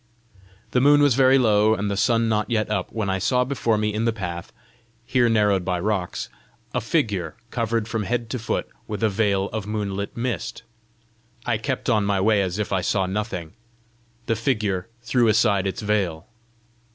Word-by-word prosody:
The 125 - +2
moon 145 +2 +6
was 145 -3 +5
very 130 +1 +5
low, 110 -3 +4
and 100 0 -2
the - - -1
sun 115 +3 +2
not 110 0 0
yet 110 -2 0
up, 100 -4 -2
when 110 -3 -2
I 95 0 0
saw 125 +6 +2
before 125 -4 0
me 105 0 0
in 110 +2 -1
the 115 - +3
path, 90 -5 -6 0.5
here 125 -1 +2
narrowed 105 -4 +3
by 90 -1 -1
rocks, 95 -2 -2 0.5
a - - 0
figure 90 -7 -1 0.2
covered 115 -2 -1
from 110 0 -2
head 120 +2 -1
to 125 - -2
foot 115 - -2
as - - -32 0.2
with 105 +1 -4
a 110 - +4
veil 100 -1 +1
of 110 -2 -3
moonlit 100 -1 -3
mist. 120 -1 -3 0.8
I 115 -3 0
kept 130 +2 -3
on 110 -4 +3
my 100 -1 +1
way 105 +1 +3
as 95 -1 -2
if 105 -1 -2
I 95 - +1
saw 95 +1 +1
nothing. 95 -4 -4 0.7
The 115 - +1
figure 105 -6 -1 0.2
threw 120 -1 +2
aside 100 -3 +3
its 105 +4 -4
veil. 100 -7 0
105 Hz, 190 wpm, -23 LUFS, 100-115 Hz, 0.8 s, moon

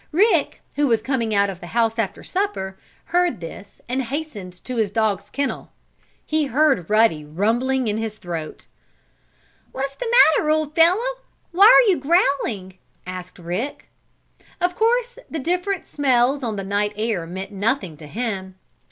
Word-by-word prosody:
Rick, 355 -3 +2 0.2
who 290 0 +3
was 230 -3 +3
coming 235 -3 -1
out 200 0 +4
of 190 -3 -6
the 175 - -9
house 225 0 +2
after 200 -4 -2
supper, 370 - -2 0.4
heard 355 - +2
this, 185 +4 -10
and 255 +2 -1
hastened 260 -8 -5
to 250 -1 -5
his 220 -3 +1
dog's 215 -1 -1
kennel. 280 -1 -3 0.6
He 310 -1 +1
heard 275 - +2
Ruddy 215 -8 +3
rumbling 230 - 0
in 210 +1 -1
his 220 -1 -4
throat. 165 -5 -6 1.1
"What's 270 +1 -3
the 460 - -4 0.3
matter, 305 - -1
old 310 -1 +1
fellow? 380 +10 +3 0.3
Why 390 +4 +7
are - - +8
you 355 - +1
growling?" 265 - 0 0.3
asked 180 0 -8
Rick. 180 +11 -5 0.7
Of 355 0 0
course 485 +3 +1
the 320 - -4
different 360 +5 -1
smells 265 -1 +2
on 225 -3 -2
the 195 - -4
night 205 +2 -1
air 215 -6 -1
meant 190 +3 -6
nothing 200 - -1
to 150 0 -11
him. 195 -2 -4
235 Hz, 155 wpm, -22 LUFS, 195-310 Hz, 1.1 s, are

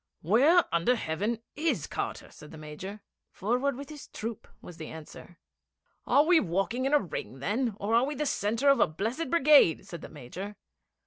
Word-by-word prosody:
'Where 275 - +5
under 170 +9 +3
heaven 215 +5 -2
is 320 +2 0
Carter?' - - -5
said 150 - -13
the 160 - -11
Major. 155 +7 -8 0.3
'Forward 250 +7 -1
with 280 +2 -8
his 300 -2 -10
troop,' 225 0 -6
was 175 - -12
the 160 - -7
answer. 160 +2 -11 0.7
'Are 285 - +5
we 345 0 +6
walking 195 - -1
in 280 - -1
a - - +6
ring, 150 - -6
then, 210 - -1
or 205 +3 -1
are 235 +2 +5
we 290 +3 -2
the 300 - -2
centre 230 +2 +1
of 275 - +5
a - - +5
blessed 225 - -3
brigade?' 295 - +5
said 170 -2 -8
the - - -9
Major. 170 +9 -8
220 Hz, 185 wpm, -29 LUFS, 170-275 Hz, 0.7 s, we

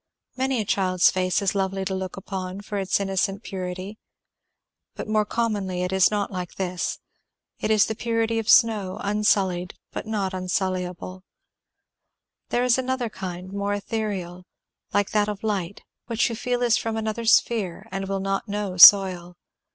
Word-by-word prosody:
Many 260 -1 0
a 215 - -1
child's 185 -2 +3
face 185 +1 0
is 195 - +1
lovely 195 -1 -1
to 190 - -2
look 190 0 -5
upon 190 0 -5
for 205 0 -4
its 190 0 0
innocent 195 +1 -1
purity, 185 +2 -6 1.0
but - - -6
more 215 0 +1
commonly 205 -6 -2
it 180 - -2
is 190 -2 +5
not 205 -1 -2
like 180 -2 -6
this; 180 -2 -3 0.6
it - - -2
is 215 -2 +4
the 220 - -3
purity 230 0 -1
of 225 - -4
snow, 210 -5 +4
unsullied, 195 -3 +1 0.2
but - - -6
not 200 -3 -2
unsullyable; 185 0 -3 1.3
there 245 - +1
is 250 0 +3
another 260 -2 -2
kind 185 -1 -7
more 200 0 -1
ethereal, 200 -4 -4 0.4
like 205 -1 0
that 210 -1 +1
of 210 0 -6
light, 200 -3 -3 0.2
which 230 -1 +1
you 230 - -4
feel 245 +1 -1
is 235 -1 +3
from 225 -1 -3
another 220 +1 -3
sphere 220 -5 +2
and 195 0 -4
will 195 0 -2
not 195 +2 -2
know 205 -2 -3
soil. 180 -2 +7
200 Hz, 160 wpm, -24 LUFS, 185-220 Hz, 1.3 s, soil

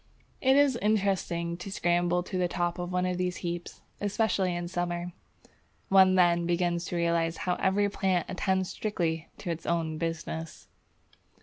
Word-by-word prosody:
It 265 0 +4
is 285 -4 +4
interesting 190 -5 0
to 185 +2 -7
scramble 175 -1 +1
to 185 - -7
the 180 -1 +2
top 175 0 -2
of 175 0 -4
one 180 0 +1
of 180 0 -1
these 180 0 -1
heaps, 175 0 -5 0.2
especially 200 -3 0
in 175 0 -3
summer. 175 0 -3 0.8
One 190 -1 +6
then 175 -2 +4
begins 175 0 0
to 180 - -4
realize 170 -1 +1
how 180 - +2
every 200 +1 +2
plant 190 -3 0
attends 190 0 0
strictly 165 -6 -2
to 175 - -4
its 165 0 -6
own 160 -2 -1
business. 165 0 -4
175 Hz, 155 wpm, -29 LUFS, 170-190 Hz, 0.8 s, One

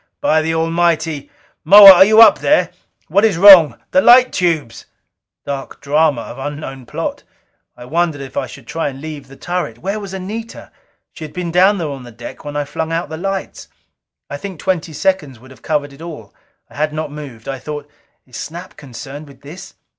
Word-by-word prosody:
By 155 0 +2
the 160 +1 -2
Almighty, 165 -2 -1 0.3
Moa, 200 +3 +10
are 190 0 +7
you 215 +3 +5
up 215 - +5
there? 300 - +1 0.4
What 200 - +1
is 215 -6 +2
wrong? 175 - +8
The 185 - +4
light 250 +4 +6
tubes 160 - -2 0.3
" - - -67
Dark 140 -1 -6
drama 145 -3 +1
of 120 - -10
unknown 135 -2 -7
plot! - - -5 0.6
I 120 - -11
wondered 160 +2 -1
if 135 -1 -10
I - - -2
should 135 - -13
try 160 +4 -3
and 135 -1 -10
leave 150 -2 -9
the 135 - -15
turret. 175 -9 -4
Where 195 - -4
was 200 -2 -8
Anita? 210 +5 -8 0.4
She - - -10
had 155 - -9
been 180 -2 -4
down 190 +4 +3
there 165 -4 -4
on 135 -1 -8
the 120 -1 -12
deck 120 +1 -11
when 145 0 -8
I 145 0 -2
flung 160 +3 -5
out 165 -1 -3
the 160 - -6
lights. 195 +2 -5 0.6
I 145 - -6
think 190 +1 -9
twenty 175 -4 -2
seconds 150 - -2
would 130 +2 -17
have 130 - -17
covered 145 -2 -3
it 140 - -16
all. 150 -12 -10 0.3
I - - -17
had 155 0 -1
not 155 -1 -5
moved. 140 -7 -10
I 135 -1 -5
thought, 150 +2 -7 0.4
"Is 125 -3 -12
Snap 175 +4 -9
concerned 140 +3 -10
with 135 -2 -18
this?" 175 +7 -12
155 Hz, 200 wpm, -17 LUFS, 140-180 Hz, 0.6 s, Moa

